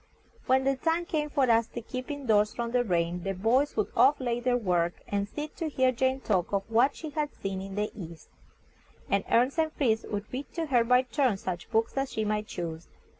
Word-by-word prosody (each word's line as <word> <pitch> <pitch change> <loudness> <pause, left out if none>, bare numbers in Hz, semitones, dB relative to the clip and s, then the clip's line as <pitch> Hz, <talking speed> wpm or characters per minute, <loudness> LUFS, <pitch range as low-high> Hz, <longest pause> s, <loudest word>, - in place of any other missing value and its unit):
When 260 +1 +4
the 270 0 +1
time 330 +4 0
came 300 -3 -1
for 275 -3 +2
us 230 0 +3
to - - -6
keep 255 +2 -6
in 285 -2 -5
doors 210 -2 +3
from 235 -1 -3
the 245 0 +2
rain, 175 -3 0
the 195 +1 -3
boys 240 +10 +1
would 215 - 0
oft 280 +3 +5
lay 240 -2 -1
by - - -12
their 250 -1 +3
work, 175 -6 +1
and 200 0 -1
sit 295 +7 -6
to 325 -2 -2
hear 260 -3 +2
Jane 260 +2 0
talk 185 -8 0
of 200 -1 0
what 240 +5 +3
she 310 -2 -7
had 295 0 -2
seen 195 -1 -4
in 195 0 -7
the 210 +1 -1
East, 170 -5 -10 0.8
and 200 0 +2
Ernest 255 +7 +3
and 315 -1 +2
Fritz 230 -7 +1
would 205 0 -4
read 270 +3 -5
to 335 -1 -1
her 250 -6 +3
by 250 +2 +4
turns 250 -4 0
such 175 -2 -4
books 225 0 +1
as 270 0 -1
she 220 - -1
might 210 0 -1
choose. 165 -1 -5
235 Hz, 230 wpm, -28 LUFS, 200-270 Hz, 0.8 s, oft